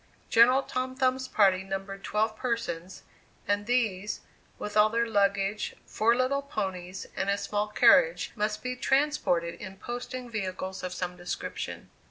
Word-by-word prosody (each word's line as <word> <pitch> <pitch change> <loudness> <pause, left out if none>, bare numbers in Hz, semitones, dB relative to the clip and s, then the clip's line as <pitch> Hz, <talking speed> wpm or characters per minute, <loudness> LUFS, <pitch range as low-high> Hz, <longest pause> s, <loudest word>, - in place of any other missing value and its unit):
General 250 +4 +6
Tom 255 0 -3
Thumb's 260 0 +1
party 190 -3 +3
numbered 195 +1 -5
twelve 215 +1 0
persons, 205 -8 -3 0.4
and 205 +1 0
these, 215 -5 0 0.4
with 210 - -6
all 210 0 +6
their 230 +1 +1
luggage, 200 -1 +1
four 230 +2 +2
little 255 +3 +1
ponies, 190 -9 -4
and 195 - -1
a 200 - +2
small 205 +1 -1
carriage, - - +4
must 210 -1 -1
be 250 0 -2
transported 250 - +1
in 190 -1 -8
posting 245 +3 -5
vehicles 190 -4 -4
of 185 -1 -4
some 180 0 -4
description. 175 0 -5
210 Hz, 145 wpm, -28 LUFS, 190-245 Hz, 0.4 s, General